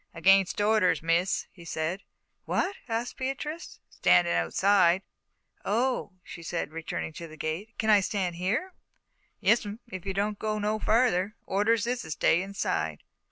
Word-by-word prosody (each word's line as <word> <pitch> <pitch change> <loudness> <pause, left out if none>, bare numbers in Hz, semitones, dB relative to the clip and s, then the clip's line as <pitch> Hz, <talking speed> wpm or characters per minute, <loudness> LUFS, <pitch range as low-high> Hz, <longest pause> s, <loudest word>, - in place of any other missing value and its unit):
"Against 195 +3 +4
orders, 205 -6 +3
Miss," 170 +3 +1
he 175 - -14
said. 165 +3 -3 0.4
"What?" 390 - 0
asked 230 +2 -2
Beatrice. 290 +5 -4
"Standin' 175 -1 +4
outside." 190 -2 +3 0.6
"Oh," 235 -1 0
she 175 - -10
said, 165 -1 -3
returning 160 0 -4
to 170 +1 -8
the 155 0 -13
gate. 160 +9 -4
"Can 220 0 +2
I 210 - +7
stand 185 -3 -2
here?" 230 - -1 0.7
"Yes'm, 215 -2 +2
if 185 -2 -6
you 190 - -2
don't 205 +1 -1
go 215 -1 -1
no 210 +1 -1
further. 215 -3 +2
Orders 210 +3 +2
is 245 +1 -1
to - - -9
stay 165 +2 +2
inside." 200 +1 -2
200 Hz, 150 wpm, -28 LUFS, 175-220 Hz, 0.7 s, I